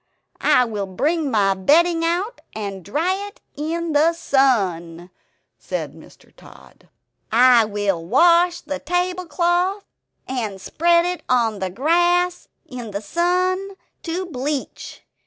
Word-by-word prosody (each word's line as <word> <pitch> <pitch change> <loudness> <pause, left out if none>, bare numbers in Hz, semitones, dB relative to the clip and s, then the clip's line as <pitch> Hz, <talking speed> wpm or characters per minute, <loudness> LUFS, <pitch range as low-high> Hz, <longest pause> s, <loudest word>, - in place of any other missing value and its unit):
I 250 - +4
will 210 -4 -4
bring 295 - -1
my 200 -5 +2
bedding 330 - +3
out, 360 +8 -2
and 200 -3 -5
dry 325 - 0
it 430 +5 -15 0.2
in 330 +3 -3
the 310 +3 +3
sun," 185 - 0 0.5
said - - -5
Mr. - - -18
Tod. - - -18 0.4
"I 240 0 +6
will 205 -5 -2
wash 345 - +3
the 285 -2 -5
tablecloth 360 +3 -1 0.4
and 225 -7 -4
spread 340 - +2
it 360 0 -3
on 230 -4 +1
the 190 -1 -2
grass 350 - +1 0.2
in 245 -3 -8
the 200 0 -5
sun 365 - 0 0.3
to 355 +3 -4
bleach. 285 -3 -5
300 Hz, 120 wpm, -21 LUFS, 215-350 Hz, 0.5 s, I